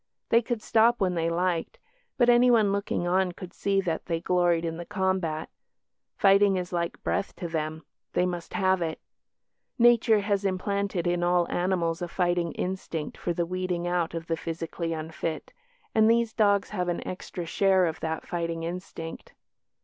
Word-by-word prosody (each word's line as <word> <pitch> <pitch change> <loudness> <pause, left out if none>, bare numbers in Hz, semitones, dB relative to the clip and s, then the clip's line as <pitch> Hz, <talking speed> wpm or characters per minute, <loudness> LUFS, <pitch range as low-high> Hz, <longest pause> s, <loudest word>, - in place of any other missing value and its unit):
They 230 - +5
could 235 -1 -3
stop 230 +2 +4
when 185 -2 +1
they 165 -1 0
liked, 175 0 -1 0.4
but 240 - +4
anyone 240 -4 +5
looking 200 -3 -1
on 180 0 +1
could 180 +1 -10
see 200 -1 0
that 165 -4 -3
they 165 -1 -1
gloried 175 -1 +2
in 165 0 -3
the 175 - -5
combat. 185 -5 -1 0.7
Fighting 195 0 +5
is 180 0 -4
like 170 -1 -2
breath - - -1
to 175 - -5
them 155 -1 -3 0.3
they 180 - +2
must 175 -2 -4
have 190 -1 +2
it. 160 -1 -2 0.8
Nature 235 -3 +5
has 200 -1 0
implanted 195 -1 -1
in 175 0 +1
all 175 0 +2
animals 175 -2 0
a 175 - -2
fighting 175 -1 0
instinct 180 -4 -4
for 175 - -3
the 170 0 0
weeding 180 0 -2
out 175 -1 0
of 165 0 -4
the 165 - -1
physically 165 +1 -4
unfit, 160 0 -4 0.4
and 220 0 +5
these 230 -1 +2
dogs 205 -2 +2
have 180 -4 -2
an 175 - -2
extra 180 -1 -6
share 190 +2 +3
of 160 -2 -3
that 160 0 -4
fighting 170 -1 -3
instinct. 165 -1 -7
180 Hz, 170 wpm, -27 LUFS, 170-195 Hz, 0.8 s, They